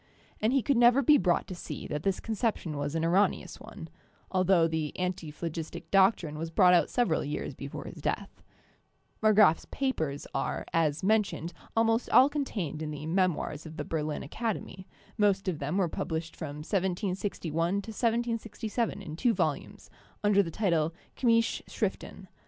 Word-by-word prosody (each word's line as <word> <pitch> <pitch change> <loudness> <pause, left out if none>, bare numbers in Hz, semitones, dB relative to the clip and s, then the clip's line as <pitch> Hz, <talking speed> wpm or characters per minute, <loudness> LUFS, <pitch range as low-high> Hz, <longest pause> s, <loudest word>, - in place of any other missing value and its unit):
And 215 +2 +2
he 270 -2 +2
could 280 -4 +2
never 240 +3 +6
be 295 +4 +6
brought 175 -2 +2
to - - -7
see 175 - -7
that 150 -1 -3
this 195 +2 0
conception 220 -7 -2
was 145 +2 -3
an 165 0 0
erroneous 185 +5 +1
one, - - -10 0.5
altho 185 -2 +4
the 160 -2 -3
anti 180 -3 -2
phlogistic 165 +1 -5
doctrine 190 -6 +3
was 165 +1 -3
brought 180 +2 +5
out 175 - +4
several 235 -10 +1
years 145 0 -4
before 140 +2 -7
his - - -9
death. - - -3 0.8
Marggrafs 215 -6 +5
papers 160 - -2
are, - - -2
as 160 -1 +1
mentioned, 200 -4 +1 0.2
almost 225 +1 +2
all 260 +2 +7
contained 205 - -3
in 155 - -3
the 150 0 -6
'Memoirs' 165 -3 0
of 160 +1 -10
the - - -3
Berlin 155 -2 -2
Acad 220 +8 -2
emy; 185 0 -10 0.3
most 200 -2 +2
of 170 -5 -1
them 150 +6 -2
were 190 -3 +2
published 160 0 -4
from 150 -2 -6
1761 180 -2 -1
1767 225 0 -2
in 155 -4 -7
two 235 +7 +2
v - - -5
volumes, 155 -5 -2 0.3
under 205 -1 +5
the 175 - -3
title 165 -4 0 0.2
'Chymische 230 -2 +2
Schriften.' - - -4
185 Hz, 165 wpm, -29 LUFS, 160-220 Hz, 0.8 s, all